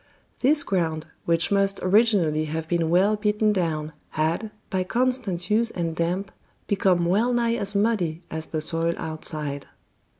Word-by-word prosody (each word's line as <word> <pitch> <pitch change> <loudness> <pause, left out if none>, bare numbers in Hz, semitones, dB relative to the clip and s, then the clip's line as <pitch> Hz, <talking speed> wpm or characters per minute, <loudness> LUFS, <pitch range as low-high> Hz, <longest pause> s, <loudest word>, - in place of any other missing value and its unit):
This 290 +3 +3
ground, 160 -4 -1 0.2
which 170 +2 +1
must 195 0 +2
originally 185 -6 +3
have 160 +1 -4
been 170 -1 0
well 190 +5 +4
beaten 210 0 +1
down, 160 -5 -2 0.2
had, 165 +8 0 0.2
by 185 -1 0
constant 225 -5 -1
use 225 +2 +3
and 165 -5 -3
damp, 180 +4 -1 0.3
become 185 -3 +2
well 210 +8 +2
nigh 235 -1 +1
as 200 -3 +1
muddy 200 -6 +1
as 160 0 -5
the 155 - -3
soil 165 +1 0
outside. 155 -3 -3
180 Hz, 145 wpm, -24 LUFS, 160-210 Hz, 0.3 s, well